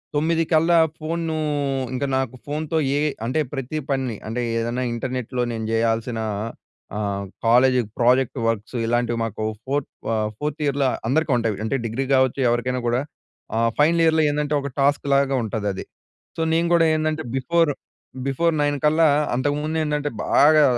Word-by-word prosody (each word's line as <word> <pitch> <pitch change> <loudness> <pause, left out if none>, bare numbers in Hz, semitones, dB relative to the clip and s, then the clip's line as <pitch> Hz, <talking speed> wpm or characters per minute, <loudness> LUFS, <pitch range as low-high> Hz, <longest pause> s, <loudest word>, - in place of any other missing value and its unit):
9 165 +2 +2
కల్లా 165 +2 +4 0.2
ఫోన్‌నూ 160 0 -2 0.6
ఇంక 140 +2 -1
నాకు 130 -1 -2
ఫోన్‌తో 155 +2 -2 0.2
ఏవి 150 0 +1 0.2
అంటే 130 +6 0
ప్రతి 135 +2 -4
పనిని 130 -4 -1
అంటే 120 +2 -2 0.2
ఏదన్నా 120 +2 -2
ఇంటర్నెట్‍లో 125 0 -3
నేను 110 -1 -4
జేయాల్సిన 115 +1 0 0.8
ఆహ్, 100 -1 -2 0.2
కాలేజీకి 125 -1 +4
ప్రాజెక్ట్ 125 +2 +3
వర్క్సు 115 +2 -2
ఇలాంటివి 120 0 0
మాకు 110 0 -5 0.2
ఫోర్త్ 140 +1 -1 0.2
ఆహ్, 110 -1 0
ఫోర్త్ 150 +1 -3
ఇయర్‍ల 140 -1 +1 0.2
అందరికుంటాయి. 125 -7 +1
అంటే 110 - -1
డిగ్రీ 120 +4 -2
గావచ్చు. 130 0 +3
ఎవరికైనా 125 +1 0
గూడా 120 +2 +1 0.6
ఆహ్, 115 0 +3
ఫైనల్ 165 +3 +4
ఇయర్‌లో 160 -1 +4
ఏందంటే, 150 0 -1
ఒక 140 - -4
టాస్క్‌లాగా 140 -1 +2
ఉంటాదది. 105 -3 -3 0.5
సో, - - -1
నేను 170 +1 +2
గూడా 165 -1 +5
ఏందంటే 155 0 -1
బిఫోరు, 150 +3 +2 0.5
బిఫోర్ 165 +5 +1
9 145 0 +1
కల్లా 155 +1 +5 0.3
అంతకుముందేంటంటే 150 +2 -1 0.2
బాగా 155 +1 +5
135 Hz, 140 wpm, -22 LUFS, 120-155 Hz, 0.8 s, గూడా